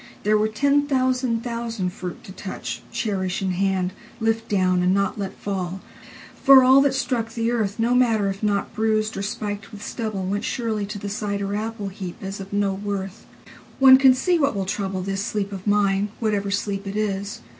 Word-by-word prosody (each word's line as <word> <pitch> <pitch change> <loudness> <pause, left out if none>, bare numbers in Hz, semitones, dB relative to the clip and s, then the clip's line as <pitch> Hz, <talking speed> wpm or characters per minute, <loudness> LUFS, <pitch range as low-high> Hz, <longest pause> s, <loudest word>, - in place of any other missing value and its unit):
There 210 +1 +3
were 215 0 +3
ten 285 +6 +2
thousand 255 -3 +1
thousand 230 -6 -3
fruit 180 -3 -7
to - - -10
touch, 120 -11 -6
Cherish 195 -5 -2
in 190 - 0
hand, 185 0 0 0.3
lift 225 0 0
down, 185 -3 +2
and 180 +1 +3
not 200 +1 0
let 195 -1 -4
fall. 190 -2 -3 0.6
For 270 -1 +9
allThat 270 +2 +5
struck 235 -4 -1
the 230 0 -1
earth, 215 -4 -1
No 235 +2 +2
matter 230 -5 +3
if 195 0 -3
not 205 -2 0
bruised 215 0 0
or - - -3
spiked 205 0 -4
with 210 -1 -9
stubble, 215 -5 -3
Went 200 +2 -2
surely 220 -5 -2
to 210 +1 -5
the 205 - -6
cider 200 -1 -2
apple 215 -1 -3
heapAs 190 +1 -7
of 195 0 -8
no 200 -1 +1
worth. 195 0 -5 0.5
One 265 -1 +9
can 265 -1 +6
see 345 +6 +1
what 280 -5 +1
will 195 -1 -1
troubleThis 195 0 -2
sleep 205 -1 -2
of 195 0 -7
mine, 205 0 +2
whatever 205 -3 0
sleep 200 0 -2
it 200 +2 -4
is. 200 -1 -2
205 Hz, 185 wpm, -23 LUFS, 195-230 Hz, 0.6 s, For